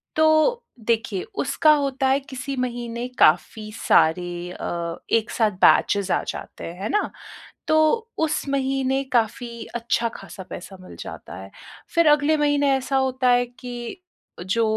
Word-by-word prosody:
तो 315 +10 +3 0.3
देखिए 220 -4 0 0.2
उसका 310 - +3
होता 275 -2 0
है 270 +1 +3
किसी 270 0 -6
महीने 240 -1 -3
काफ़ी 180 +7 +3
सारे 175 +2 +2
अ, 170 -1 -4 0.2
एक 225 0 +2
साथ 220 -3 +2
बैचेज़ 200 -2 +3
आ - - +1
जाते - - -7
हैं, 175 +3 -8
है 210 - -2
ना? 420 - +1 0.6
तो 315 +9 +3
उस 305 -3 0
महीने 270 -1 0
काफ़ी 235 0 -1
अच्छा-ख़ासा 230 -3 -3
पैसा 190 +2 -8
मिल 185 - -12
जाता - - -8
है। 95 - -11 0.4
फिर 335 -2 +5
अगले 295 +1 +4
महीने 290 -1 +2
ऐसा 265 +1 -2
होता 260 -1 +1
है 245 0 +3
कि 245 +5 -8 0.5
जो 230 +3 +2
245 Hz, 140 wpm, -23 LUFS, 215-280 Hz, 0.6 s, फिर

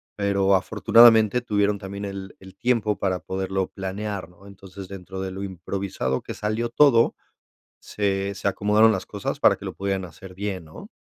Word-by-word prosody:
pero, 100 -1 +1
afortunadamente, 115 +4 +5
tuvieron 105 -3 0
también 100 +1 -6
el 100 -1 -7
el 95 0 -14
tiempo 115 -4 0
para 95 -2 0
poderlo 95 0 -2
planear, 100 -1 -5
¿no? 90 +2 -20
Entonces, 95 -1 -11
dentro 95 0 -8
de 95 0 -4
lo 95 +1 -7
improvisado 95 -7 -3
que - - -7
salió 110 +3 -2
todo, 120 -3 +4 0.7
se 100 -1 -2
se - - -5
acomodaron 105 +3 +4
las 95 -3 -3
cosas 100 -1 -4
para - - +5
que - - -13
lo - - -5
pudieran 95 -1 -2
hacer 90 +2 -12
bien, 95 -3 -4
¿no? 75 - -12
100 Hz, 170 wpm, -24 LUFS, 95-105 Hz, 0.7 s, afortunadamente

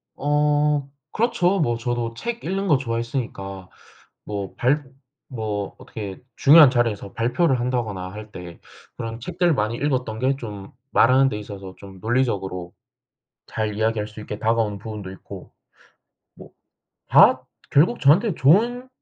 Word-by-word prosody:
어. 150 0 +1 0.2
그렇죠. 200 -5 +1
뭐 120 -7 +1
저도 120 -1 -2
책 235 - -5
읽는 195 +2 -2
거 150 - +4
좋아했으니까 115 -6 -4 0.6
뭐 100 -2 -5
발 145 +4 +2 0.5
뭐 105 -4 -4
어떻게 100 -3 -7 0.2
중요한 145 -2 +8
자리에서 115 -5 -1
발표를 125 +4 +1
한다거나 110 -7 -2
할 105 +1 -10
때 85 -1 -10 0.4
그런 115 0 -5
책들 175 +5 0
많이 110 +1 -1
읽었던 125 -5 -1
게 135 +2 +1
좀 105 -1 -8 0.2
말하는데 130 -1 +4
있어서 100 -2 -9
좀 95 -2 -12
논리적으로 100 -7 -1 0.7
잘 110 -1 -3
이야기할 110 -1 0
수 105 - -14
있게 105 -1 -6
다가오는 110 -2 0
부분도 105 -2 -7
있고, 95 - -11 0.8
뭐 - - -14 0.6
다 - - +6 0.3
결국 170 +12 +4
저한테는 170 +8 +4
좋은 235 - +3
115 Hz, 285 characters per minute, -23 LUFS, 105-145 Hz, 0.8 s, 중요한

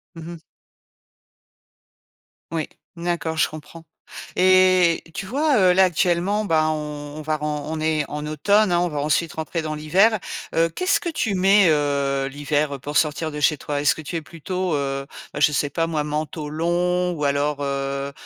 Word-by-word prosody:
Mmh 165 -1 -9
mh. 170 - -9 2.1
Oui. 160 -2 -2 0.3
D'accord, 170 -2 -2
je - - +3
comprends. 155 +2 -11 0.5
Et, 185 -2 +4
tu 195 - -5
vois, 285 +4 +1
heu, 185 -2 +5
là 190 0 +6
actuellement, 180 +4 +1
ben, 155 -2 +2
on 150 -1 -5
on 155 - -6
va 155 0 -1
ren 150 -1 -3
on 160 0 -3
est 155 -1 +1
en 150 0 -5
automne, 200 +6 +2
hein, 175 - +3
on 175 - +1
va 150 -3 -4
ensuite 155 +2 0
rentrer 160 +1 -3
dans 155 -1 -3
l'hiver. 190 +9 +3 0.4
Heu, 165 0 +2
qu'est-ce 365 - +1
que 340 - -4
tu 220 -10 -1
mets, 195 +2 +5
heu, 140 -2 +1
l'hiver 145 0 -2
pour 145 +3 -6
sortir 155 +1 +1
de 150 - -6
chez 150 0 +2
toi? 145 +1 -3
Est-ce 145 - +4
que - - -9
tu 160 +3 -5
es 160 - -3
plutôt, 180 +2 -3
heu, 135 -1 -2 0.3
heu, - - -3
je 150 - +4
sais 145 0 0
pas 165 +3 0
moi, 155 -2 -1
manteau 150 0 -4
long 175 +3 0
ou 150 -3 -3
alors 145 +1 0
heu, 140 0 -3
155 Hz, 185 wpm, -22 LUFS, 150-180 Hz, 2.1 s, là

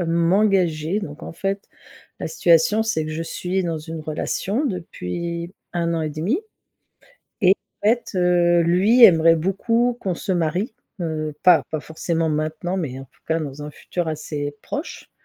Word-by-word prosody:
heu, 175 - 0
m'engager. 170 0 +2
Donc 150 -7 -7
en - - -7
fait 195 +3 -3 0.5
la - - -4
situation 190 - +3
c'est 160 -9 -1
que 155 - -4
je 165 +1 -3
suis 180 +3 -2
dans 165 -2 -2
une 160 +1 -7
relation 185 - -2
depuis 170 - -4 0.2
1 170 -1 0
an 160 - -1
et 155 - -2
demi 175 - -1 1.0
et 190 0 +7 0.3
en - - +5
fait, 240 +1 +1
heu, 175 -1 +3
lui 195 +9 +5
aimerait 165 -4 +7
beaucoup 230 +8 +1
qu'on 185 -2 -1
se 190 - -3
marie, 175 +6 -1 0.3
heu, 155 -2 -3
pas 180 -3 +6
pas 155 - -2
forcément 160 +1 -2
maintenant 155 +4 -2
mais 135 -7 -4
en 135 - -8
tout 130 - -29
cas 160 0 +2
dans 145 -2 -6
un 150 - -6
futur 175 +3 -4
assez 145 -2 -4
proche. 295 +4 -6
170 Hz, 170 wpm, -22 LUFS, 155-190 Hz, 1.0 s, et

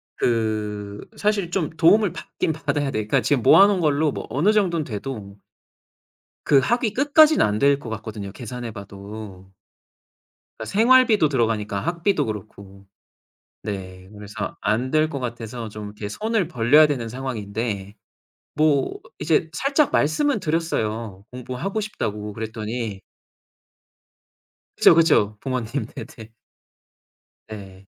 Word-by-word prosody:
그 105 -3 -2 0.2
사실 205 -4 0
좀 175 -5 -1
도움을 180 +5 +4
받긴 160 - -3
받아야 145 -1 -2
돼요. 110 -4 -1
그러니까 - - +2
지금 135 -5 +1
모아놓은 195 +8 +6
걸로 150 -1 +2
뭐 - - -6
어느 165 +10 +2
정도는 180 -7 +1
돼도 105 -3 -6 1.1
그 140 - +5
학위 230 - 0
끝까지는 295 +4 +5
안 105 0 -1
될 140 +2 +4
것 125 - -8
같거든요, 110 -2 -6
계산해 120 +2 -7
봐도. 100 -1 -10 1.1
그러니까 110 - -6
생활비도 225 - +4
들어가니까 110 -6 0
학비도 170 -1 0
그렇고. 100 -2 -8 0.8
네. 95 -3 -7
그래서 105 -1 -6
안 115 +5 0
될 155 +1 +2
것 140 -3 -5
같아서 120 -1 -5
좀 105 0 -8
이렇게 105 0 -7
손을 215 - -1
벌려야 150 +1 +5
되는 130 -6 -3
상황인데 110 -5 -4 0.6
뭐 150 -3 +1 0.2
이제 160 +2 +1
살짝 275 - +1
말씀은 220 - +1
드렸어요 115 - -2
공부하고 125 - -4
싶다고. 105 - -4
그랬더니 110 -1 -5 1.8
그죠, - - +6
그죠. 130 -11 +3
부모님 125 -1 -3
네네. 110 -1 -10 1.2
네. 95 -3 -10
120 Hz, 280 characters per minute, -23 LUFS, 105-160 Hz, 1.8 s, 모아놓은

